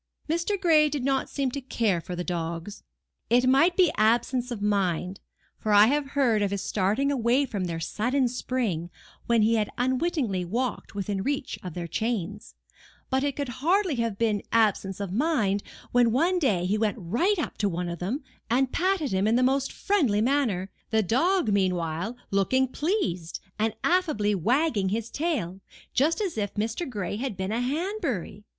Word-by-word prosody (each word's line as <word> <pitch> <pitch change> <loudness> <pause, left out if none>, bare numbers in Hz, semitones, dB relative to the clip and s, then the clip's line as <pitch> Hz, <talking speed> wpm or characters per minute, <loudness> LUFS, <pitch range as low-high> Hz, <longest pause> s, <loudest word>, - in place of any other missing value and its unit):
Mr. 340 +5 0
Gray 315 -5 +4
did 285 -3 -3
not 270 0 0
seem 275 -3 -1
to 280 - -4
care 220 -8 0
for 180 +2 -6
the 175 - -3
dogs. 170 +2 -4 0.5
It 245 +2 +4
might 305 +7 +4
be 360 -5 +5
absence 240 +3 +2
of 240 -4 -4
mind, 195 -2 0 0.4
for 215 - -1
I 205 +1 +8
have 280 +3 +1
heard 235 -6 +3
of 200 - +1
his 200 -1 -3
starting 215 +8 +1
away 255 +1 +2
from 205 -7 -3
their 165 -2 -3
sudden 245 - 0
spring 235 -9 -2 0.4
when 235 -2 +4
he 225 +1 +3
had 210 -1 0
unwittingly 255 - 0
walked 235 +5 -3
within 200 -1 -2
reach 275 +3 -2
of 180 -4 -7
their 175 -1 -4
chains: 210 +1 -3 0.6
but 265 +1 +2
it 285 -2 -1
could 285 -3 -3
hardly 365 +2 +2
have 230 -3 -1
been 215 -3 +1
absence 205 -4 +2
of 195 -2 -4
mind, 220 -7 +1 0.3
when 240 -1 +4
one 345 +9 +2
day 200 - +1
he 205 +4 0
went 220 +1 0
right 240 - +1
up 325 - -4
to 205 - +2
one 175 0 -3
of 170 -1 -5
them, 230 - -3 0.3
and 255 +2 +2
patted 365 -5 0
him 190 +2 +1
in 225 - +3
the 250 - +3
most 270 +1 +1
friendly 285 - +1
manner, 225 -7 +1 0.2
the 220 -1 +2
dog 330 - +2
meanwhile 180 +1 0
looking 260 +7 +2
pleased, 240 - -2 0.2
and 220 0 0
affably 305 - +2
wagging 225 - +1
his 225 +3 -3
tail, 265 - -2 0.3
just 315 - +2
as 370 - -2
if 205 -1 -3
Mr. 225 +9 -2
Gray 205 -3 -3
had 245 -4 -4
been 190 +1 -2
a 230 +2 0
Hanbury. 275 - -3
230 Hz, 180 wpm, -26 LUFS, 200-280 Hz, 0.6 s, I